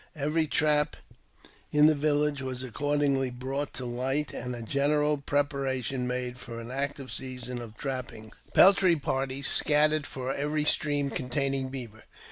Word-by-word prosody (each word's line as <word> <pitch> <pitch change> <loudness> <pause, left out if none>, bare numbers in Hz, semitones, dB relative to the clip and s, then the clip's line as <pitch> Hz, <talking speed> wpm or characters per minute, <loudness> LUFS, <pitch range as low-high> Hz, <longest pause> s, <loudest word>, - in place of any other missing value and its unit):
Every 155 +2 0
trap 150 0 +2 0.7
in 150 0 +5
the 155 - +7
village 145 -1 +1
was 130 -1 -3
accordingly 140 +1 0
brought 135 +3 -3
to; 130 - -4
light, 130 +5 -1
and 125 0 -4
a 120 - -6
general 150 +4 +2
preparation 135 -3 -1
made 125 0 -3
for 120 -2 -7
an 115 +1 -7
active 140 0 -3
season 125 -1 -4
of 115 -2 -9
• - - -26
trapping: 120 -5 -5 0.2
peltry 190 -3 +7
parties 135 -1 -2
scattered 150 0 +3
for 130 0 -3
every 150 +1 -1
stream 145 -2 +2
containing 135 +1 -1
beaver. 120 -5 -8
135 Hz, 145 wpm, -28 LUFS, 125-145 Hz, 0.7 s, the